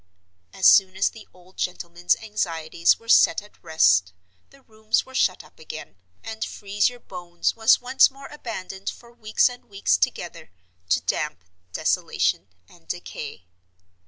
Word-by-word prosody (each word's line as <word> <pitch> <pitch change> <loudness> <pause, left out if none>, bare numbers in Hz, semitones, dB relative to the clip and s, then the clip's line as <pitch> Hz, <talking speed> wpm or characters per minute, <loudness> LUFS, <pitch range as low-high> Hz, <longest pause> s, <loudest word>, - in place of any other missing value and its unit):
As 190 - -3
soon 190 -1 +6
as 195 - +2
the 220 -2 -14
old 180 +1 -21
gentleman's 175 -1 -1
anxieties 170 -6 0
were 230 - -21
set - - +5
at 210 - -21
rest 90 - +3 0.4
the 275 -1 -21
rooms 220 -1 -1
were 260 - -15
shut 185 -7 +1
up - - -21
again, 155 -9 -9 0.3
and 220 0 -5
"Freeze 205 +2 0
your 245 0 -12
Bones" 175 -4 -3
was 225 -1 +5
once 255 +2 +5
more 275 0 -14
abandoned 200 -8 -6
for 235 -1 -12
weeks 220 -2 +2
and 245 -1 -8
weeks 195 - +1
together - - -3 0.4
to - - +3
damp, 90 +3 -3 0.3
desolation, 95 - 0 0.2
and 170 - -21
decay. 150 - -7
190 Hz, 150 wpm, -24 LUFS, 170-225 Hz, 0.4 s, soon